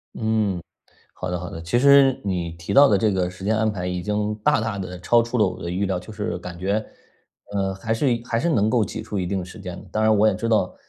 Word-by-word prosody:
嗯， 110 -5 0 0.5
好 90 - -5
的 90 - -2
好 90 0 -6
的， 80 - -7
其 85 +8 0
实 140 0 +6
你 90 -4 -2
提 85 +3 -6
到 140 +6 +7
的 105 - +4
这 105 +1 +2
个 90 -2 0
时 95 +1 -10
间 110 +2 +2
安 110 0 +1
排 90 -4 -4
已 90 0 -2
经 105 +1 -1
大 105 - +2
大 110 -2 -2
地 90 -1 -6
超 120 +6 +4
出 120 +2 -3
了 105 -3 +4
我 90 0 -5
的 85 - -4
预 95 +3 -1
料， 95 -2 -1
就 90 - -11
是 105 -4 -4
感 90 -1 -8
觉， 100 +4 0 0.7
呃， 95 -1 -1
还 110 +4 -3
是 120 +2 +2
一 115 - -11
还 115 -1 -1
是 170 - 0
能 110 -9 +2
够 115 -1 +3
挤 100 - -4
出 105 - -4
一 90 - -1
定 95 +2 -1
的 - - -5
时 90 - -11
间 90 -1 -7
的。 - - -12
当 110 - 0
然 110 0 +4
我 105 +2 +4
也 110 - +3
知 115 - -3
道， 110 -2 +1
100 Hz, 305 characters per minute, -23 LUFS, 90-110 Hz, 0.7 s, 到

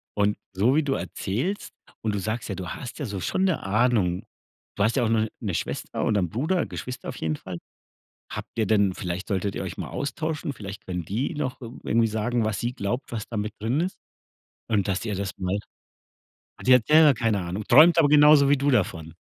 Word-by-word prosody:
Und 105 0 +2 0.2
so 110 +8 +3
wie 155 - +3
du 140 -1 0
erzählst 135 - -3 0.3
und 110 -2 -1
du - - -1
sagst 110 +4 -3
ja, 100 - -2
du 90 -1 -6
hast 125 +3 -7
ja 145 - -2
so 100 -4 -4
schon 190 - -1
'ne 185 -4 0
Ahnung. 105 -2 +1 0.5
Du 100 - +1
hast 110 +5 +2
ja 125 - +2
auch 110 - +1
noch 110 -1 +2
'ne 100 -5 -2
Schwester - - -3
oder 105 - +2
'n 90 - -1
Bruder 160 - 0
Geschwister 125 0 -6
auf - - -6
jeden 80 -1 -1
Fall. 90 +3 -7 0.7
Habt - - -6
ihr 110 - +2
denn 100 -2 +3
vielleicht 90 +3 -5
solltet 100 0 -1
ihr - - -3
euch - - -6
mal - - -4
austauschen. 150 +2 -3
Vielleicht 100 -5 -9
können 90 -2 -3
die 115 - -2
noch 135 -3 -3
irgendw 120 +1 -10
irgendwie 115 0 +3
sagen, 110 +2 0
was 110 -2 -1
sie 120 +1 -2
glaubt, 120 +3 -3
was 110 -3 -4
da 115 - -5
mit 105 0 -2
drin 115 +8 0
ist. 185 +3 -2 0.7
Und 105 -4 +1
dass 95 +3 -1
ihr 105 - -2
das 100 -1 -3
mal 95 +2 -1 1.0
Ach, - - -10
die 130 - +6
hat 120 -3 +2
selber 155 -1 +7
keine 115 -4 0
Ahnung, 90 +4 -4
träumt 155 +7 +7
aber 155 - +6
genauso 145 -1 +7
wie 145 - +5
du 140 +2 +1
davon? 85 - 0
110 Hz, 220 wpm, -25 LUFS, 100-135 Hz, 1.0 s, selber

